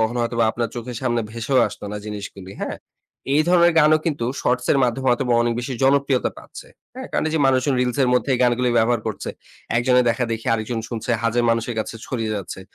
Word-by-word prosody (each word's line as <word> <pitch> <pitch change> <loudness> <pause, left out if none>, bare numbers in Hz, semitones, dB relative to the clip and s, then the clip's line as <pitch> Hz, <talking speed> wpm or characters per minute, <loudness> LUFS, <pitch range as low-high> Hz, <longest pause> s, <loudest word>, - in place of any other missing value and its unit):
কখনো 110 +2 0
হয়তোবা 115 0 +1
আপনার 115 -1 -2
চোখের 120 0 -6
সামনে 120 -2 +1
ভেসেও 115 +4 0
আসতো - - -10
না - - -4
জিনিসগুলি, 100 -2 -7
হ্যাঁ? - - -3 0.6
এই 150 - +4
ধরনের 175 -1 +5
গানও 155 0 +5
কিন্তু 145 -7 -1 0.2
শর্টস 125 0 0
এর 140 - +2
মাধ্যমে 125 +2 -2
হয়তোবা 125 0 +1
অনেক 120 0 +1
বেশি 125 +2 -5
জনপ্রিয়তা 140 -1 +2
পাচ্ছে, - - -12 0.3
হ্যাঁ? 260 0 -7
কারণ - - 0
এইযে 160 +1 -1
মানুষজন 130 +1 +2
রিলস 125 +1 -1
এর 130 - +2
মধ্যে 125 +2 0
এই - - -1
গানগুলি 125 0 +2
ব্যবহার 120 +1 +2
করছে। 110 - -4 0.5
একজনের 125 +1 +3
দেখাদেখি 115 -1 -2
আরেকজন 115 +1 -3
শুনছে, 115 0 -4
হাজার 115 +1 +1
মানুষের 115 +1 -1
কাছে 110 - -3
ছড়িয়ে 115 -4 -2
যাচ্ছে। 95 -1 -6
120 Hz, 200 wpm, -22 LUFS, 115-130 Hz, 0.6 s, ধরনের